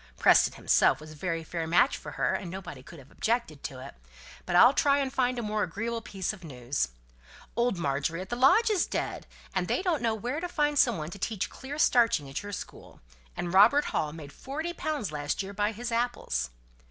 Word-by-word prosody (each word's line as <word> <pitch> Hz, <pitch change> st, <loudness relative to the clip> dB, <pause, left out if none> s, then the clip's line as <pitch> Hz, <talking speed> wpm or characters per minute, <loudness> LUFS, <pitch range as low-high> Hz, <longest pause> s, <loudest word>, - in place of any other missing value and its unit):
Preston -, -, +5 dB
himself -, -, +3 dB
was 155 Hz, 0 st, -11 dB
a -, -, -11 dB
very 165 Hz, +1 st, -3 dB
fair 165 Hz, 0 st, -4 dB
match 180 Hz, -, +4 dB
for -, -, -8 dB
her, -, -, 0 dB
and 185 Hz, -, -3 dB
nobody 175 Hz, -7 st, -7 dB
could 165 Hz, +6 st, -13 dB
have 140 Hz, -1 st, -15 dB
objected 225 Hz, -, -1 dB
to 130 Hz, -, -6 dB
it. -, -, -10 dB, 0.5 s
But 175 Hz, -, -1 dB
I'll 245 Hz, +9 st, +8 dB
try 280 Hz, 0 st, +3 dB
and 270 Hz, -2 st, -1 dB
find 250 Hz, -1 st, +1 dB
a 240 Hz, -, -2 dB
more 210 Hz, 0 st, -1 dB
agreeable 225 Hz, +6 st, -2 dB
piece 195 Hz, -3 st, -3 dB
of 195 Hz, -3 st, -13 dB
news. 130 Hz, -, -2 dB, 0.7 s
Old 235 Hz, -4 st, +1 dB
Margery 145 Hz, +2 st, -1 dB
at 190 Hz, +1 st, -7 dB
the 240 Hz, -, -2 dB
lodge 280 Hz, -, +5 dB
is 390 Hz, -5 st, +1 dB
dead; -, -, -3 dB, 0.3 s
and -, -, 0 dB
they -, -, 0 dB
don't 340 Hz, -8 st, +1 dB
know 225 Hz, -2 st, +1 dB
where 245 Hz, +7 st, -3 dB
to 355 Hz, +1 st, -4 dB
find 295 Hz, -3 st, +1 dB
some 240 Hz, -6 st, +4 dB
one 155 Hz, +1 st, -5 dB
to 200 Hz, -, -9 dB
teach 215 Hz, 0 st, -2 dB
clear 275 Hz, +3 st, -7 dB
starching 230 Hz, -, +3 dB
at 135 Hz, -, -4 dB
your 205 Hz, -, -7 dB
school; 200 Hz, -, -9 dB, 0.4 s
and 175 Hz, 0 st, -3 dB
Robert 230 Hz, +10 st, +6 dB
Hall 150 Hz, -, 0 dB
made 150 Hz, -2 st, -10 dB
forty 310 Hz, +6 st, -5 dB
pounds 300 Hz, -, -3 dB
last 145 Hz, +5 st, -2 dB
year 195 Hz, +1 st, -7 dB
by 205 Hz, +1 st, 0 dB
his 235 Hz, +2 st, -5 dB
apples." 230 Hz, -, -1 dB
205 Hz, 215 wpm, -28 LUFS, 165-250 Hz, 0.7 s, I'll